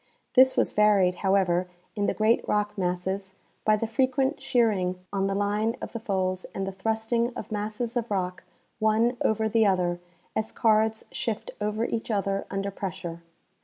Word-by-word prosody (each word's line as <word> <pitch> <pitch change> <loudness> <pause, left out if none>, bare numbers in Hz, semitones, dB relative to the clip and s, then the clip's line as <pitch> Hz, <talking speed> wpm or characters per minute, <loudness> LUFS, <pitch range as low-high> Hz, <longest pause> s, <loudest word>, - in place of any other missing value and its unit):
This 260 0 +6
Avas - - +1
varied, 205 -4 +4
however, 185 -2 +2 0.3
in 205 -1 0
the - - 0
great 220 +2 +3
rock 210 0 0
masses 190 +1 -2 0.3
by 215 - +4
the 215 - -1
frequent 265 +5 +1
shearing 210 -8 +1
on 195 -1 +1
the 195 - -1
line 210 +3 0
of - - -7
the 230 - -3
folds 185 -3 -1
and 195 - -2
the 195 - -3
thrusting 225 +4 0
of - - -7
masses 215 +3 -3
of 235 -1 -1
rock 185 -3 -2 0.4
one 220 +3 +3
over 220 0 +2
the 220 0 +3
other, 180 -2 +1 0.4
as 220 0 -1
cards 220 0 +2
shift 225 -3 -3
over 210 +2 0
each 230 0 -3
other 200 -2 -1
under 195 +1 -2
pressure. 170 -3 -5
210 Hz, 165 wpm, -27 LUFS, 190-225 Hz, 0.4 s, This